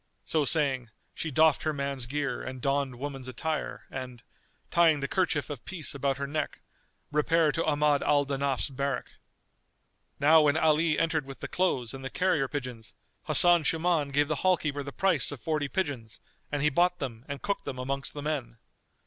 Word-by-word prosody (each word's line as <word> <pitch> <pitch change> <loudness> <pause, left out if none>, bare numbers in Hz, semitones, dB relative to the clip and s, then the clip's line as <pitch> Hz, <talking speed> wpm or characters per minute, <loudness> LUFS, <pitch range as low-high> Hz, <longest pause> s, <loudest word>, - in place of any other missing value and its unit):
So 155 -3 +1
saying, 135 -6 0 0.2
she 165 - -3
doffed 155 +1 +4
her 155 - -1
man's 140 -3 -3
gear 145 +1 -2
and 130 0 -6
donned 135 0 0
woman's 135 0 -6
attire[FN#241] 155 +4 -3
and, 125 -3 -7 0.5
tying 165 -3 +4
the 140 - -2
kerchief 160 -6 0
of 135 -6 -7
peace 175 -6 -2
about 140 -1 -1
her 140 - -3
neck, 150 +2 -3 0.5
repaired 150 +1 +2
to 165 - -1
Ahmad 150 -1 +2
al 145 -1 +3
Danaf's 140 0 -1
barrack. 140 0 -3 1.1
Now 155 +2 +6
when 150 0 +3
Ali 155 0 +3
entered 160 -4 0
with 135 - -9
the - - -4
clothes 135 -11 0
and 135 0 -8
the 135 - -4
carrier 170 -6 +1
pigeons, 125 -5 -6 0.3
Hasan 175 -1 +6
Shuman 160 -2 +1
gave 145 +1 +2
the 155 -1 -1
hall 185 -1 +3
keeper 145 -2 -3
the 140 0 -6
price 170 -6 +2
of 145 - -7
forty 155 -1 -1
pigeons 140 - -3 0.3
and 145 -1 -1
he 150 - +3
bought 175 +4 +2
them 125 -7 -6
and 140 -2 -6
cooked 200 - -2
them 130 - -5
amongst 135 +3 -4
the 145 - -5
men. 135 -7 -3
145 Hz, 185 wpm, -28 LUFS, 135-155 Hz, 1.1 s, Now